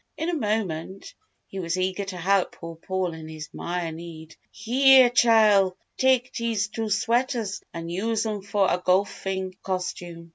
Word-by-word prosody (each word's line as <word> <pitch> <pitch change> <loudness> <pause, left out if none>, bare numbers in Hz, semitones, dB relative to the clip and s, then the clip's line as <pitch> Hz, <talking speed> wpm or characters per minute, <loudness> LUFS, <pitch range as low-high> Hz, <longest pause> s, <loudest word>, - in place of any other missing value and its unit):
In 320 - -2
a - - -1
moment, 195 - -3 0.3
he 195 - -7
was 170 0 -2
eager 185 +2 -1
to 190 -2 -6
help 190 +2 +1
poor 165 -1 -9
Paul 185 +1 -3
in 160 -1 -9
his 155 -1 -8
"mire" 175 -1 -3
need. 160 -1 -10 0.2
"Heah, 255 +3 +5
Chile, 215 -6 +5 0.3
tak' 260 -1 +3
dese 225 -3 -1
two 220 0 -4
sweaters 230 0 0
an' 165 -1 -6
use 220 +6 -1
'em 210 -2 -3
fo' 200 +1 0
a 180 -1 0
go'fing 190 0 0
costume. 175 -2 -5
195 Hz, 155 wpm, -25 LUFS, 175-225 Hz, 0.3 s, Heah